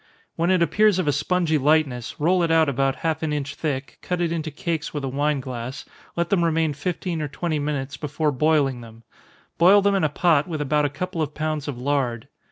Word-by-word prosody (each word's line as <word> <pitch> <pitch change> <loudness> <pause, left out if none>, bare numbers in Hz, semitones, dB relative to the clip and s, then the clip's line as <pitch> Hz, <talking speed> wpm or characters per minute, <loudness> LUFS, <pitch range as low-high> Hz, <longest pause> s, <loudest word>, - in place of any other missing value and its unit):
When 170 +2 0
it 185 -2 +4
appears 210 +2 +3
of 185 -4 -1
a - - +4
spongy 155 +2 +1
lightness, 140 -4 +1
roll 175 +4 +3
it 170 - +1
out 165 -1 +4
about 135 0 +1
half 160 -1 0
an 160 -2 -1
inch 145 -1 -3
thick, 135 -4 -4
cut 180 -1 -2
it 170 -1 0
into 160 -2 -2
cakes 160 -1 -4
with 145 - -3
a - - -1
wine 145 +2 0
glass, 125 0 -6 0.3
let 170 0 -1
them 185 -4 +3
remain 160 -2 +1
fifteen 170 +2 -3
or 150 - -2
twenty 155 +2 -2
minutes 145 -2 -3
before 150 0 -1
boiling 140 -2 +1
them 115 0 -13 0.6
boil 185 +4 +7
them 200 0 +3
in 195 - +1
a 155 - +3
pot, 160 -3 +2
with 160 -3 -4
about 150 +1 +1
a - - +1
couple 170 +4 -4
of 150 -1 -3
pounds 155 -1 -2
of 140 -4 -4
lard. 125 -3 -1
150 Hz, 220 wpm, -23 LUFS, 140-170 Hz, 0.6 s, boil